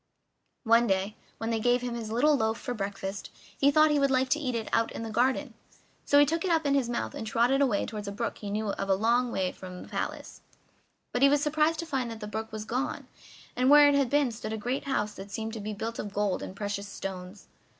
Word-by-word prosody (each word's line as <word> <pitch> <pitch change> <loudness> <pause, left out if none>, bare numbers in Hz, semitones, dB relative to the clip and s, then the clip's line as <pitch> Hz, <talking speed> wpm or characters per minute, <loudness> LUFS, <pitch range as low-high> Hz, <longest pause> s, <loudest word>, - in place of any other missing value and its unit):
One 230 0 +4
day, 195 +2 0 0.2
when 225 0 -3
they 225 - 0
gave 245 +2 +2
him 245 -1 -3
his 230 -2 -5
little 290 +7 +4
loaf 220 -3 0
for 250 - -4
breakfast, 195 -2 -5 0.3
he 280 - +4
thought 310 +1 +5
he 295 - +3
would 275 0 +3
like 260 0 +2
to 300 - +2
eat 255 -5 -2
it 225 -2 -3
out 230 0 +2
in - - -5
the 225 - -5
garden; 255 +3 +1 0.5
so 285 - +4
he 290 - +8
took 325 +3 -1
it 375 - -1
up 325 -2 +2
in 280 - +2
his 270 -4 +1
mouth 110 - -2
and 220 - -6
trotted 245 +5 +2
away 245 -8 +2
toward 210 -2 -6
a - - -3
brook 230 +3 -3
that - - -18
he 205 - -5
knew 210 +1 -2
of 195 0 -3
a 190 - +5
long 235 +4 +2
way 185 -4 -1
from 180 -1 -9
the - - -13
palace. - - -5 0.7
But 245 - 0
he 275 - +7
was 290 0 +2
surprised 310 +2 +2
to - - -6
find 265 -6 -2
that 225 -1 -7
the 210 - -6
brook 220 +1 -5
was 215 0 -5
gone, 255 +5 -3 0.5
and 255 +1 +2
where 290 0 +8
it - - +3
had 280 -3 +2
been 285 -2 +2
stood 220 -1 -6
a - - -2
great 245 +5 -3
house 210 -6 -1
that 195 0 -9
seemed 220 +2 -4
to 225 - -5
be 210 +1 -5
built 225 +3 -4
of 205 -1 -6
gold 205 -2 0
and 185 - -7
precious 205 -1 -4
stones. 190 0 -7
230 Hz, 260 wpm, -28 LUFS, 210-270 Hz, 0.7 s, he